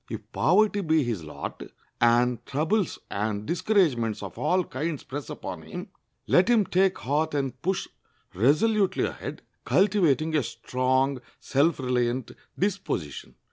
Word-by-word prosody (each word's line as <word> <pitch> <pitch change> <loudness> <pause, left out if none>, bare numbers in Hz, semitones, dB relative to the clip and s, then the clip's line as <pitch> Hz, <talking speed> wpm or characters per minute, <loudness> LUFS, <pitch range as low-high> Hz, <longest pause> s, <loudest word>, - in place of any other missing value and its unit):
If - - -7
poverty 205 +4 +3
be 160 -4 +2
his 115 -9 -3
lot, 75 - -7 0.4
and 120 +1 +3
troubles 165 +8 0
and 105 0 -2
discouragements 160 - +1
of 100 - -7
all 185 0 +1
kinds 155 0 -4
press 145 +2 -6
upon 150 - -6
him, 180 +4 -8 0.4
let 180 - +4
him 230 -4 +4
take 190 +1 +2
heart 150 +3 -1
and 135 -3 -2
push 190 +1 -1 0.5
resolutely 190 - +2
ahead, - - -6 0.2
cultivating 160 -6 +2
a 150 - +4
strong, 130 +2 0 0.2
self 150 +5 +2
reliant 125 -1 -1 0.3
disposition. 180 - -3
150 Hz, 130 wpm, -26 LUFS, 125-185 Hz, 0.5 s, let